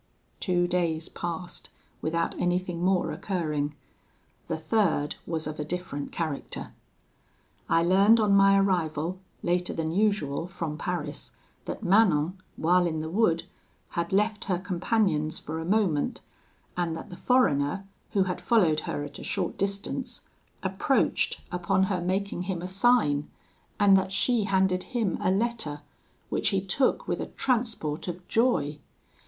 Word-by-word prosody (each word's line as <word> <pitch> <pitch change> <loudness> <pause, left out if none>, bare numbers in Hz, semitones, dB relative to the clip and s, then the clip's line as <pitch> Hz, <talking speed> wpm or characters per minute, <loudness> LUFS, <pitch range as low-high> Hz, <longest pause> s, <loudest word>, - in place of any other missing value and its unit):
"Two 180 -2 +1
days 170 -3 0
passed 175 +1 -5 0.3
without 165 +1 0
anything 175 -1 0
more 185 -1 +2
occurring: 150 -6 -2 0.7
the - - -1
third 160 -3 +1
was 160 -2 -2
of 150 0 -5
a - - 0
different 155 -3 -4
character. 155 -4 -4 1.0
I 165 - +4
learned 195 +6 +5
on 210 -2 +3
my 195 0 +6
arrival, 175 -3 0 0.2
later 180 +1 0
than 160 -1 -1
usual, 175 -6 +1
from 170 -5 -4
Paris, 150 -2 -4 0.3
that - - -5
Manon, 185 -3 +3
while 175 +2 +3
in 160 -2 -2
the 160 +1 -5
wood, 170 -5 +2 0.5
had 170 -1 -2
left 210 +2 +1
her 185 -3 +1
companions 180 -4 0
for 160 +2 -5
a 160 - -4
moment, 185 -6 +1 0.5
and 170 -2 -1
that - - -9
the - - -7
foreigner, 195 - +2 0.3
who 195 - +4
had 180 -1 -3
followed 180 -10 +3
her 145 - -2
at 145 0 -8
a - - -8
short 185 -4 -2
distance, 195 0 -2 0.4
approached, - - +1
upon 185 +2 +1
her 190 -2 0
making 190 +1 -1
him 175 -2 -2
a - - -3
sign, 190 -8 +3 0.5
and 200 -2 +7
that 190 0 +1
she 225 +2 +2
handed 190 -2 +2 0.2
him 220 -5 0
a - - +2
letter, 195 -8 -1 0.5
which - - +1
he 195 - +1
took 255 - +1
with - - -1
a - - -3
transport 225 - -1
of 180 0 -6
joy. 220 - +1
180 Hz, 145 wpm, -27 LUFS, 160-195 Hz, 1.0 s, and